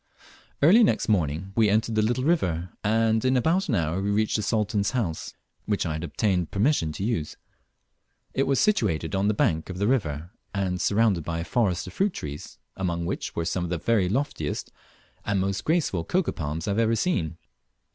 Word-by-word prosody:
Early 200 +10 +7
next 210 - +1
morning 90 -1 0
we 110 -2 +4
entered 110 +2 +1
the 110 - +2
little 120 +4 0
river, 90 - +1
and 110 +1 +2
in 130 0 +3
about 170 - +1
an 120 - +2
hour 85 +1 0
we 100 - -1
reached 105 +1 +1
the 105 - +1
Sultan's 105 -1 0
house, 85 -10 -3 0.3
which 105 -3 0
I 80 - -1
had 80 +1 -4
obtained 90 -1 0
permission 100 - +1
to 95 - -5
use. 100 -9 -2 1.0
It 135 - +1
was 135 -1 +2
situated 100 - +1
on 95 +1 +1
the 105 - +2
bank 80 -4 +1
of 90 - -5
the 100 - 0
river, 85 - -1 0.2
and 95 -2 -1
surrounded 100 -5 +2
by 85 +2 -3
a 85 - -2
forest 95 0 0
of - - -9
fruit 195 -1 +1
trees, 75 0 -7 0.2
among 85 -3 -2
which - - -4
were 85 - -1
some 90 0 -1
of 90 - -3
the 90 - -1
very 100 +1 +1
loftiest 135 +8 -2 0.5
and 100 -1 0
most 95 +1 -1
graceful 155 - +1
cocoa 185 - 0
nut - - -13
palms 80 +2 -4
I - - +1
have 100 - 0
ever 115 0 +3
seen. 85 - -1
100 Hz, 200 wpm, -26 LUFS, 85-115 Hz, 1.0 s, Early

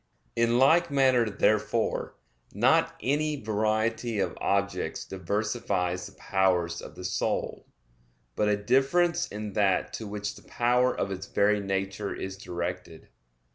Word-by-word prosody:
In 115 0 +2
like 160 +7 +5
manner 130 -5 +3
therefore, 110 +2 0 0.4
not 160 +9 +3
any 150 +3 +1
variety 110 +1 0
of 95 -4 -1
objects 100 0 -1
diversifies 95 -1 -2
the - - -14
powers 90 -3 0
of - - -10
the 90 - -8
soul, 95 - -2 0.7
but 105 - +1
a 105 - +2
difference 160 +10 +2
in 105 0 -6
that 100 -3 +1
to 110 - -5
which 105 0 -4
the - - -14
power 125 +1 +2
of 100 - -3
its 95 - -5
very 105 +1 +2
nature 95 +1 -3
is 95 0 -5
directed. 90 -2 -6
105 Hz, 135 wpm, -28 LUFS, 95-120 Hz, 0.7 s, like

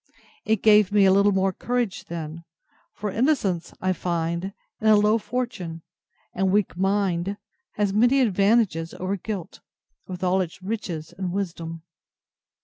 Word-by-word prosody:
—It 220 -2 +1
gave 210 -2 +6
me 205 -1 +5
a 190 - +6
little 200 +2 +4
more 190 0 +1
courage 240 -2 -2
then; 165 0 -6 0.5
for 210 -1 -4
innocence, 215 - 0
I 185 0 +1
find, 170 0 -2 0.4
in 220 - +1
a 215 - +7
low 210 +2 +4
fortune, 205 -10 -4 0.5
and 190 0 +1
weak 205 -4 +1
mind, 195 0 0 0.4
has 205 -2 0
many 245 +6 +4
advantages 200 -6 +2
over 185 +2 -2
guilt, 195 -3 -6 0.5
with 185 0 -6
all 185 +1 +2
its 180 +1 -6
riches 185 -7 -4
and 185 -2 -3
wisdom. 165 -4 -4
195 Hz, 140 wpm, -24 LUFS, 175-210 Hz, 0.5 s, a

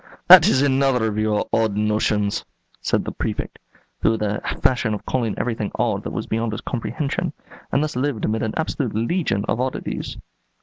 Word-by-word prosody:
"That 180 -1 +10
is 135 -8 +3
another 135 -3 +2
of 110 -1 -1
your 110 -1 +1
odd 110 -3 +2
notions," 105 -1 +1 0.4
said - - 0
the - - -3
Prefect, - - -4 0.4
who 110 - +3
had 110 - -2
the 105 0 -1 0.2
fashion 120 -4 +2
of 105 - -9
calling 115 -5 -1
everything 110 -4 -2
"odd" - - 0
that - - -3
was - - -3
beyond 115 0 -1
his - - -4
comprehension, 140 +8 -3 0.4
and 140 - +2
thus 155 0 -3
lived 130 -3 -1
amid 110 +1 0
an 110 - -2
absolute 145 -7 -2
legion 115 - 0
of 120 - 0
"oddities." 130 0 -3
115 Hz, 180 wpm, -22 LUFS, 110-135 Hz, 0.4 s, That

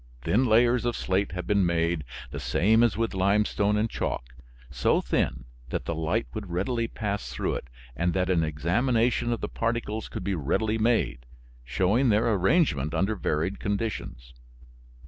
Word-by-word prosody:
Thin 125 - +2
layers 120 +2 +4
of 120 -1 -1
slate 95 0 -1
have 90 -1 -4
been 100 -1 +2
made, 85 -2 0 0.3
the - - -5
same 110 +6 +3
as 120 -3 +3
with 115 -1 -1
limestone 100 +2 +2
and 110 +2 +1
chalk, - - -4 0.4
so 60 -2 +2
thin 60 +1 -1 0.2
that - - -3
the 85 - -2
light 80 +8 -1
would 105 -4 -6
readily 115 +7 -1
pass 105 -2 -4
through - - -2
it - - -5 0.3
and 85 +6 +1
that 90 -1 +1
an 90 -3 +2
examination 115 - +1
of 120 - -2
the - - -2
particles 115 -2 -2
could - - -6
be 100 +1 -1
readily 110 +8 0
made, 65 - +1 0.4
showing 95 - +2
their 110 +2 +3
arrangement 90 - +2
under 95 +6 +1
varied 85 +1 -1
conditions. 100 - -4
100 Hz, 165 wpm, -27 LUFS, 85-115 Hz, 0.4 s, layers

